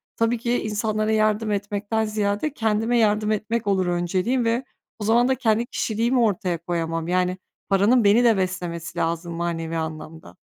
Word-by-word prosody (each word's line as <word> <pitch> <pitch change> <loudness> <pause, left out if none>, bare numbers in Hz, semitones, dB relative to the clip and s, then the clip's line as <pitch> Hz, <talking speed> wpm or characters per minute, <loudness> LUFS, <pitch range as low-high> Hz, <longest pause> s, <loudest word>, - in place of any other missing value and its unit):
tabii 230 +1 +1
ki 240 +1 -1
insanlara 215 0 -1
yardım 215 0 +1
etmekten 205 +2 -1
ziyade 210 +6 -1
kendime 225 -1 0
yardım 215 -1 +2
etmek 215 +1 -2
olur 190 -2 +2
önceliğim 185 +8 0
ve 230 +3 +1 0.4
o - - -4
zaman 235 +3 +3
da 265 - +2
kendi 230 -2 +1
kişiliğimi 235 +2 0
ortaya 190 -6 +1
koyamam. 165 -1 -3
Yani, 180 +1 0 0.3
paranın 205 +5 +4
beni 210 +4 +5
de 225 -4 +4
beslemesi 175 -3 -3
lazım 170 +1 -2
manevi 165 -1 -3
anlamda. 160 - -7
210 Hz, 155 wpm, -23 LUFS, 175-225 Hz, 0.4 s, beni